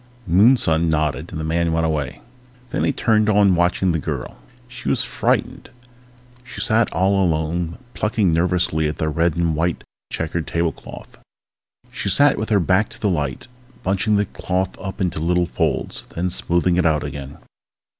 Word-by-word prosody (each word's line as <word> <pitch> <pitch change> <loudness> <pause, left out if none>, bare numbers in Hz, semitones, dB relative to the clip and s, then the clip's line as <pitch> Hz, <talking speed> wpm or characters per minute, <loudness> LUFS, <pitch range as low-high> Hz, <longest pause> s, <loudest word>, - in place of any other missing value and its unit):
Moonson 85 -4 +4
nodded 75 0 -1
and 85 - -5
the - - -3
man 85 +1 0
went 80 0 +1
away. 75 -4 -2 0.5
Then - - -1
he - - +2
turned 110 -5 +2
to 110 - +3
watching 90 -2 +3
the 80 - 0
girl. - - -5 0.3
She - - -6
was - - +2
frightened. - - -1 0.7
She 125 - -10
sat 115 0 +2
all 95 +3 +2
alone, 85 0 -1 0.2
plucking 105 -5 +1
nervously 85 -2 +1
at 75 - -4
the 80 - -1
red 85 +2 +1
and 85 -2 0
white 85 +2 -1 0.3
checkered 80 0 -3
tablecloth. 85 -1 -4 0.7
She - - -3
sat 140 +7 +4
with 110 - -3
her 105 -2 +4
back 95 +4 +2
to - - -10
the 105 - +1
light, 75 - -2 0.4
bunching 100 +3 +1
the 100 0 +2
cloth 95 0 -3
up 95 +2 -6
into 90 -4 -1
little 90 +2 +1
folds, 85 - -2
then 90 +2 -1
smoothing 85 0 +1
it 90 - +2
out 75 -2 +1
again. 70 -1 -7
85 Hz, 165 wpm, -21 LUFS, 80-95 Hz, 0.7 s, Moonson